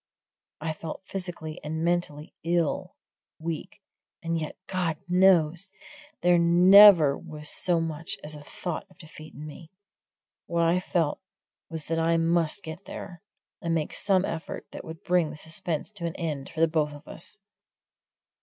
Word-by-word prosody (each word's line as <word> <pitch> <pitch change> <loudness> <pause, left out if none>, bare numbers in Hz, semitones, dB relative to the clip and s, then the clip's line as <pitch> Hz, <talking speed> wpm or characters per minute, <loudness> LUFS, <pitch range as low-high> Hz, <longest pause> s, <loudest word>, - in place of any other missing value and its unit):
I 160 0 -2
felt 160 +3 -7
physically 175 -5 -6
and 160 +2 -3
mentally 170 -4 -1
ill 170 -2 0 0.4
weak. 160 -1 -6 0.4
And 165 0 -1
yet, 155 - -5
God 175 -4 -1
knows! 180 0 +4 0.5
there 175 -1 +5
never 175 -2 +8
was 150 -1 -5
so 175 -2 +1
much 165 0 -4
as 150 +1 -5
a 150 - -9
thought 170 +4 -5
of 185 - -22
defeat 155 -1 -12
in 150 - -8
me. 155 +2 -10 0.8
What 170 0 +1
I 170 +2 +3
felt 170 -4 0 0.5
was 160 -2 -5
that 165 0 -1
I 165 +1 +3
must 165 +2 +1
get 160 +3 -8
there, 175 -4 -8 0.4
and 165 0 0
make 155 -2 -2
some 195 -2 +2
effort 160 - -5
that - - -8
would 160 0 -9
bring 175 -3 +2
the 150 - -8
suspense 160 +3 -2
to 180 -5 -4
an 165 - -5
end 150 -5 -4
for 165 0 +2
both 155 -2 0
of 145 0 -13
us. 175 - -4
165 Hz, 155 wpm, -27 LUFS, 155-175 Hz, 0.8 s, never